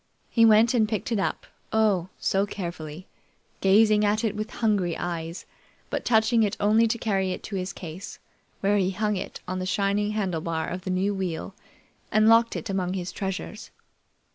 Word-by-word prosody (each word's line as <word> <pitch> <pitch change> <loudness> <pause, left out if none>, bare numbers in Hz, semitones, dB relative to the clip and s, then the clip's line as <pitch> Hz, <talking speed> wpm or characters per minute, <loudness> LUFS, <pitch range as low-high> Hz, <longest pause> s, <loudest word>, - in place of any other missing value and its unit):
He 230 -1 +5
went 225 +2 +6
and 220 -3 +2
picked 215 +1 -3
it 225 - +1
up, - - -2 0.3
oh! 205 -5 +2
so 195 +1 +1
carefully, 170 -3 -6 0.5
gazing 210 +2 +4
at 210 +2 +1
it 215 -2 0
with 215 +1 -4
hungry 200 -9 0
eyes, 170 -1 -4 0.5
but - - -2
touching 225 0 +3
it 210 -1 0
only 220 +3 +4
to 225 - -1
carry 195 -4 0
it - - -8
to 205 - -6
his 185 0 -2
case, 175 +2 -8 0.4
where 200 +1 +3
he 190 -2 +2
hung 210 +2 -1
it 185 - -6
on 185 +1 -3
the 185 - -3
shining 205 +2 0
handlebar 165 -6 -2
of 180 +1 -5
the - - -3
new 190 +2 +1
wheel 185 -1 -4 0.6
and 215 0 +4
locked 230 +1 +5
it - - -4
among 190 -2 -1
his 180 -1 -4
treasures. 195 +2 -5
200 Hz, 180 wpm, -26 LUFS, 185-215 Hz, 0.6 s, went